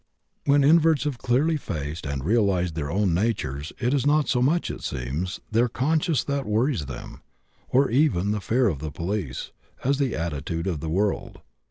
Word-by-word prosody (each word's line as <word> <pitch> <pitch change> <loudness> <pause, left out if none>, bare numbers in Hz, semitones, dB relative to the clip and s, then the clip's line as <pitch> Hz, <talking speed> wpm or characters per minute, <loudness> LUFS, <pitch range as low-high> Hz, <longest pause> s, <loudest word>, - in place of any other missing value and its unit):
When 140 0 +4
inverts 160 0 +5
have 145 -5 -3
clearly 145 +6 +2
faced 80 - -5
and 70 -2 -3
realized 95 -5 +2
their 75 -3 -3
own 95 +1 +1
nature 90 - -1 0.2
it 125 +2 0
is 140 - +2
not 150 +1 +3
so 125 - +1
much, 160 +7 +2
it - - -8
seems, 70 +8 -3
their 120 +3 +3
conscience 150 +3 +1
that 140 -3 -2
worries 110 - +1
them, 70 - -8 0.5
or 135 +2 +4
even 115 - +2
the 105 0 -1
fear 125 +5 +2
of 80 -9 -1
the 80 +1 -4
police, 85 -2 -4 0.3
as 140 +2 +1
the 135 -4 0
attitude 80 +1 -3
of 90 -6 -1
the 80 - -4
world. 100 +5 -1
105 Hz, 180 wpm, -25 LUFS, 80-140 Hz, 0.5 s, inverts